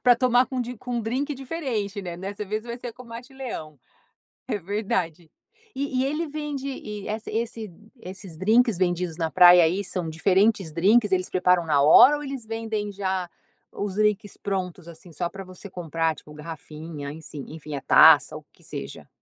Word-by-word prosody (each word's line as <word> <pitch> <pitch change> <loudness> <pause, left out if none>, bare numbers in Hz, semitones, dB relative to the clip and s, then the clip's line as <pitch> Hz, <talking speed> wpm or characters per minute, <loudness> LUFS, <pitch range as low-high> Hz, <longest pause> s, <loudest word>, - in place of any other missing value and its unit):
Pra 245 -1 +7
tomar 250 0 +3
com 260 -2 -3
d 245 0 -4
com 245 +2 -5
um - - 0
drinque 270 +6 -2
diferente, 250 - -3
né, 175 -2 -6
dessa 200 +3 -5
vez 215 +2 -3
vai 235 0 -5
ser 245 -1 -7
com 250 - -13
Matte 235 +3 -10
Leão. 160 - -7 0.7
É - - -1
verdade. 180 -4 -3 0.5
E 265 -2 -1
e - - +1
ele 305 +4 -1
vende 290 -2 -4
e 210 -6 -7
essa 215 +1 -4
esse 225 -3 -3 0.3
esses 185 -3 -9
drinques 220 +3 +3
vendidos 175 -2 -1
na 165 -2 -1
praia 175 +3 +8
aí, 180 +5 +1
são 180 -2 -2
diferentes 190 +2 +2
drinques? 205 +5 +3
Eles 185 -1 +1
preparam 180 -2 +2
na 145 -3 +3
hora 250 - +8
ou 295 - -7
eles 270 -4 -6
vendem 220 -2 -3
já 190 -3 -2 0.4
os 200 -2 -4
drinques 210 -1 0
prontos, 185 -3 -4
assim, 170 +1 -13
só 175 +1 -2
para 195 0 -8
você 185 +2 -11
comprar? 165 -2 -1
Tipo, 150 - -14
garrafinha, 150 -1 -8
enfim-, 150 -2 -8
enfim 155 -2 -7
a 140 - -4
taça - - +7
o - - -12
que - - -22
seja? 70 0 -7
200 Hz, 185 wpm, -25 LUFS, 170-235 Hz, 0.7 s, praia